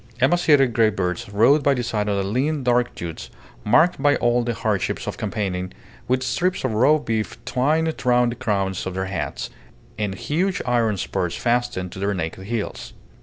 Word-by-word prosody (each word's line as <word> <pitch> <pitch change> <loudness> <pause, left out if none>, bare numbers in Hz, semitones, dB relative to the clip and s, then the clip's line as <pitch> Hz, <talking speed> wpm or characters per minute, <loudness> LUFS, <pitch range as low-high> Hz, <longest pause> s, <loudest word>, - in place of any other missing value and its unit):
Emaciated 140 -3 +4
greybeards 95 -6 0
rode 115 +9 +4
by 140 -1 +3
the 125 - -2
side 105 -3 -1
of 100 -1 0
lean 135 +8 -1
dark 125 0 +1
youths, 80 -8 -6 0.3
marked 155 +7 +3
by 145 0 +4
all 120 0 +2
the 120 -1 -2
hardships 105 -4 -1
of - - -4
campaigning, 95 -3 -3 0.4
with 130 +1 +1
strips 175 +9 0
of 130 -4 0
raw 130 +8 +4
beef 115 -7 -3
twined 155 +5 +1
round 125 -1 +3
the - - -5
crowns 95 -5 -1
of 95 - -5
their 95 0 -1
hats, 95 0 -4 0.5
and 100 -2 -1
huge 180 - -1
iron 115 -4 +1
spurs 90 -2 -2
fastened 120 -7 -1
to - - -8
their 100 +1 0
naked 90 +2 -4
heels. 115 -2 -4
120 Hz, 170 wpm, -22 LUFS, 100-130 Hz, 0.5 s, Emaciated